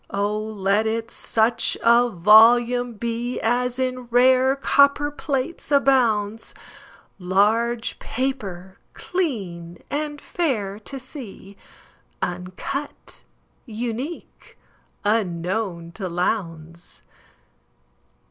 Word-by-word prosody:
Oh, 205 +1 -1
let 210 0 0
it 225 +1 -2
such 225 +1 +1
a 235 +1 +5
volume 235 +5 +5
beAs 240 +2 -2
in 255 -1 -2
rare 255 +2 +4
copperplates 280 +2 +1
abounds, 230 -6 +2 0.6
Large 220 +6 +1
paper, 200 -8 -4
clean, 190 - -4
and 295 0 -3
fair 215 - -2
to 270 +5 -8
see, 245 -7 -10 0.6
Uncut, 185 +11 -5 0.5
unique, 240 +8 -6 0.5
unknown 180 -3 -1
to 185 +1 -6
Lowndes. 170 -2 -4
230 Hz, 75 wpm, -22 LUFS, 195-255 Hz, 0.6 s, a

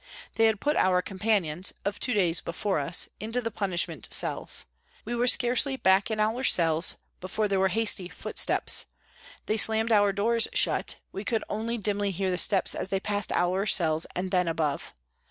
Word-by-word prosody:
They 225 - +2
had 220 -2 0
put 295 +5 0
our 180 -1 +2
com 190 - -9
panions, 190 -5 0
of 200 0 -3
two 250 - -1
days 175 -4 +1
before 180 +2 -2
us, 155 +5 +1
into 225 +3 -3
the 230 -2 -4
punishment 175 - -2
cells. - - +1 0.4
We 235 - -4
were 240 +1 0
scarcely 255 +2 +3
back 190 -4 +2
in 220 -1 -3
our 220 +4 0
cells 165 -7 +3 0.2
before 210 +4 -2
there 195 -1 0
were 190 - +3
hasty 195 -2 +1
footsteps; - - -1 0.6
they 215 - -1
slammed 220 +1 +1
our 205 -2 +4
doors 225 +3 +1
shut, - - +1 0.2
we 195 - -6
could 225 0 -1
only 225 +3 -2
dimly 205 -1 -1
hear 190 0 -2
the 180 - 0
steps 195 -3 +3
as - - -4
they 195 - -1
passed 205 0 -2
our 185 +3 0
cells 160 -4 +2
and 185 +1 -3
then 180 -2 +1
above. 160 -3 -3
200 Hz, 185 wpm, -27 LUFS, 180-220 Hz, 0.6 s, our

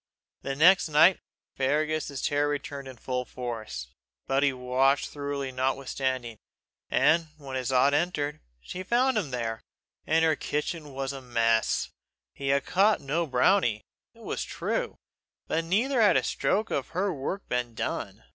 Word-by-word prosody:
The 135 - -3
next 175 +4 +5
night, 160 +5 +6 0.4
Fergus's 150 +1 -1
terror 145 0 +1
returned 140 -1 -4
in 130 -2 -10
full 125 +1 -2
force; 110 - -6 0.3
but 135 +1 +1
he 140 -1 +4
watched 130 +2 +1
thoroughly 140 -2 -4
notwithstanding, 130 -2 -2 0.5
and 165 0 +3
when 135 -3 -7
his 130 0 -2
aunt 130 +2 +4
entered, 150 -2 0 0.2
she 180 - -7
found 245 +6 +2
him 200 -9 0
there, 115 -3 -3 0.5
and 160 +1 +3
her 160 -1 +3
kitchen 150 +1 -3
in 135 -2 -12 0.2
a 135 - -7
mess. 115 -2 +1 0.4
He 140 - -6
had 140 0 +2
caught 200 +3 +3
no 160 +5 -1
brownie, 125 - +2 0.3
it - - -16
was - - -3
true, - - -3 0.5
but 165 +1 -1
neither 235 +9 +2
had 210 - +6
a - - +1
stroke 215 +3 0
of 135 - -1
her 195 0 +1
work 160 +8 -4
been 125 -2 -2
done. - - -4
140 Hz, 155 wpm, -27 LUFS, 130-165 Hz, 0.5 s, night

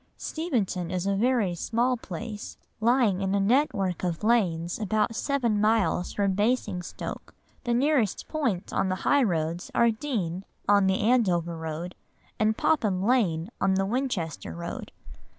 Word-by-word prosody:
Steventon 220 - -2
is 180 0 -2
a 200 - +1
very 225 -3 +2
small 235 +8 0
place, 210 0 -7 0.2
lying 225 -4 +3
in 195 0 0
a - - +2
network 200 - +1
of 175 +1 -2
lanes 175 -7 +1
about 215 +2 0
seven 235 -5 0
miles 210 -5 +2
from 200 -2 0
Basingstoke. 205 -3 -2 0.3
The 240 -1 +1
nearest 260 -5 +1
points 245 - -2
on 190 - +1
the 185 - 0
high 285 - +4
roads 170 -5 -1
are 235 -1 +5
Deane, 210 - -3 0.2
on 200 -1 +5
the 190 0 +1
Andover 185 -8 +2
Road, 160 +2 -5 0.5
and 215 0 +2
Popham 210 -12 +1
Lane 200 -6 +1
on 190 0 +3
the 195 0 +1
Winchester 195 - -2
Road. 85 - -6
205 Hz, 145 wpm, -27 LUFS, 180-235 Hz, 0.5 s, are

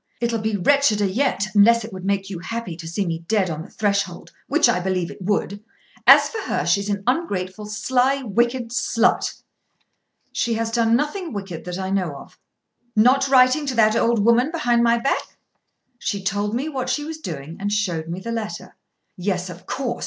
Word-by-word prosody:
"It'll 235 -1 0
be 220 0 -1
wretcheder 215 -1 +3
yet; 205 +1 0
unless 230 +3 +5
it 220 - -10
would 185 -1 -8
make 195 -1 0
you 190 -4 -6
happy 230 -1 -5
to 165 0 -9
see 185 +4 -2
me 165 -2 -2
dead 200 -4 +1
on 155 0 -4
the 185 - -10
threshold, 200 -4 -2 0.2
which 300 -1 +4
I 235 -6 +2
believe 180 -1 -2
it - - -12
would. 205 +1 -2 0.4
As - - +8
for 450 - -6
her, - - -2
she's 200 +4 +1
an 200 -1 -2
ungrateful, 210 - -2
sly, 260 +5 +1
wicked 235 +2 0
slut." 235 -1 +1 0.9
"She 235 -1 -1
has 225 0 -2
done 230 -1 +3
nothing 300 +5 -2
wicked 195 -5 -6
that 180 0 -4
I 190 0 -3
know 180 -7 -1
of." - - -13 0.6
"Not 255 +5 +4
writing 265 +2 +4
to 260 - -1
that 215 -1 +4
old 230 -2 +2
woman 235 +4 +4
behind 245 -8 +1
my 235 0 +4
back?" 235 +4 -2 0.6
"She 200 -2 -3
told 205 +3 -1
me 270 +5 -2
what 265 -5 -3
she 255 +3 -1
was 315 +1 -6
doing 160 - -7
and 205 +1 -2
showed 180 -6 -1
me 170 +2 -4
the 230 +5 -6
letter." 225 -2 -5 0.4
"Yes; 180 -1 -2
of 175 +1 -13
course. 250 -3 -3
215 Hz, 190 wpm, -22 LUFS, 190-245 Hz, 0.9 s, As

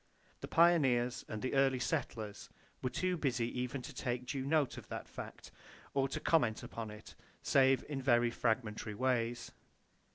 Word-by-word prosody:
The - - -6
pioneers 135 -8 +4
and 110 -1 -5
the 130 - -1
early 135 -1 +4
settlers 120 -6 -3 0.3
were 125 - 0
too 185 +6 0
busy 125 -6 0
even 125 +1 -3
to - - -8
take 125 -1 -2
due 135 +1 -3
note 150 -3 +2
of - - -14
that - - -6
fact, - - -9 0.4
or 135 -1 +1
to - - -3
comment 120 -10 +2
upon 115 -2 -6
it, 105 0 -11 0.3
save 135 -1 +4
in 140 -3 -3
very 120 -2 +3
fragmentary 110 -3 -1
ways. 120 -1 0
125 Hz, 160 wpm, -35 LUFS, 120-135 Hz, 0.4 s, pioneers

